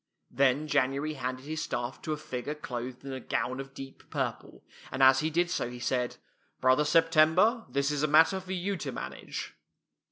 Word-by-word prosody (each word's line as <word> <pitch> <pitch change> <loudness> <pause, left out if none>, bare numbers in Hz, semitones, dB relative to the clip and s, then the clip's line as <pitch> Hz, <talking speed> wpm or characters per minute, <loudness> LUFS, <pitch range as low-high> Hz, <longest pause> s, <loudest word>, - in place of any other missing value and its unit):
Then 140 +2 +2
J 150 -1 +4
anuary 140 +4 -1
handed 130 +1 -4
his 155 +1 -3
staff 120 0 -3
to 155 - -4
a 155 - -1
figure 130 +1 -5
clothed 125 -2 -6
in 135 - -5
a 130 - -4
gown 130 +1 -2
of 135 0 -8
deep 135 0 -10
purple, - - -4 0.3
and 130 +1 +1
as 130 0 +7
he 155 - 0
did 175 +2 +1
so 120 - -1
he 125 - -8
said, 125 0 -1 0.2
" - - -41
Brother 130 +3 +4
September, 165 - +4
this 140 +1 0
is 145 -1 -1
a 150 - +2
matter 160 +6 +5
for 190 0 -6
you 190 +2 -2
to - - -4
manage." - - -6
140 Hz, 200 wpm, -29 LUFS, 130-155 Hz, 0.3 s, as